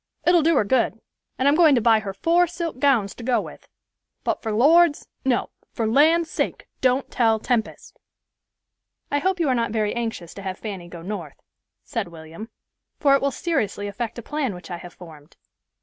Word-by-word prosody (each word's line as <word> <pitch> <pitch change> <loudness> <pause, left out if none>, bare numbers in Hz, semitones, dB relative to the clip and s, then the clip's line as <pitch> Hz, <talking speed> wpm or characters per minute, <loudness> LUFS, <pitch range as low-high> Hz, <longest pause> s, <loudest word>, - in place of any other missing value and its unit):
It'll 350 -1 +5
do 325 +1 +3
her 260 - +4
good; 230 +1 +1 0.4
and 260 - +1
I'm 285 - +5
going 315 -3 +6
to - - +3
buy 225 -1 +4
her 200 -2 -5
four 335 - +2
silk 335 -5 -5
gowns 250 -8 +2
to 235 - -11
go 245 0 +2
with, - - -9 0.6
but - - -1
for 220 - -3
Lord's—no, 290 0 +2 0.2
for 230 - -1
land's 310 +8 +4
sake - - -2 0.2
don't 260 +1 +1
tell 225 -3 +3
Tempest." 230 0 -3 1.1
"I 285 - +2
hope 375 +4 0
you 330 - +1
are 260 - +3
not 230 -2 0
very 215 -1 -1
anxious 225 -8 -4
to 200 - -9
have 190 -1 -5
Fanny 195 -5 -7
go 170 -1 -10
North," 205 +4 -6 0.4
said 230 -8 -3
William; 165 +6 -10 0.5
"for 280 -2 +4
it 275 - +3
will 280 - +2
seriously 230 - -2
affect 225 +3 -5
a 235 - -7
plan 275 -6 -2
which 180 +1 -11
I 175 - -3
have 175 0 -12
formed." 155 -4 -14
235 Hz, 190 wpm, -23 LUFS, 205-285 Hz, 1.1 s, going